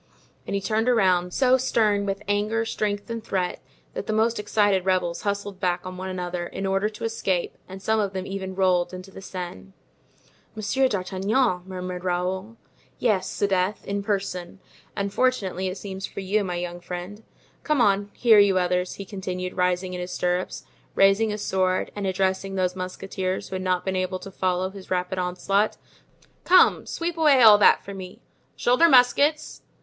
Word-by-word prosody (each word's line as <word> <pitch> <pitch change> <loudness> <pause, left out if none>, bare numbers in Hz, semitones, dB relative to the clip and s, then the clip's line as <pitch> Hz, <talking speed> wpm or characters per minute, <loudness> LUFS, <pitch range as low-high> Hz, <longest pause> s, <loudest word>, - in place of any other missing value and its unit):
And - - -2
he 200 - -1
turned 220 +4 0
around, 185 -6 +3
so 260 +4 +4
stern 210 -5 +1
with 195 +1 -3
anger, 210 +3 0
strength 205 -2 -2
and 230 -1 -4
threat, 185 -4 -2 0.3
that - - -5
the 215 - -1
most 225 +1 +1
excited 205 -2 +2
rebels 180 -2 0
hustled 200 -1 -3
back 180 -1 -1
on 185 0 -6
one 185 +1 -5
another, 180 -1 -4
in 195 - -5
order 195 +2 +1
to 215 - -10
escape, 195 -6 -1
and 190 +1 -9
some 220 +1 +2
of 200 -2 0
them 190 -1 -4
even 190 -1 -5
rolled 185 -1 +1
into 185 +1 -10
the 195 - -10
Seine. 175 - -7 0.8
"Monsieur 220 +5 +1
d'Artagnan!" 195 +1 0
murmured 180 -1 -5
Raoul. 185 +4 -2 0.4
"Yes, 210 -6 +1
'sdeath! 195 0 0
in 200 0 -2
person, 195 -3 -3 0.4
and 200 -1 -2
fortunately 200 -8 0
it 185 +1 -4
seems 190 -1 -6
for - - -7
you, 200 +2 +1
my 180 -2 -3
young 175 0 -4
friend. 180 +4 -7 0.4
Come 305 -2 0
on, 200 -3 +3
here, 225 -3 +6
you 200 -2 +5
others," 180 0 0
he 200 - -7
continued, 185 -2 -5
rising 180 0 0
in 180 - -4
his 180 - -5
stirrups, 180 0 -2 0.3
raising 195 +3 +4
his 210 0 -4
sword, 185 -1 0
and 200 -1 -3
addressing 190 +1 -1
those 185 -1 0
musketeers 185 0 -4
who 190 - -5
had 185 - -3
not 185 -1 0
been 190 -1 -1
able 185 0 -1
to 195 +1 -10
follow 185 0 -1
his 195 -1 -12
rapid 180 0 -1
onslaught. 195 +3 0 0.7
"Come, 365 +1 +5
sweep 335 0 -3
away 285 -5 +5
all 210 -2 +9
that - - +5
for 200 - -7
me! 185 -1 -9 0.3
Shoulder 255 +8 +4
muskets! 285 +4 +3
190 Hz, 175 wpm, -24 LUFS, 185-210 Hz, 0.8 s, all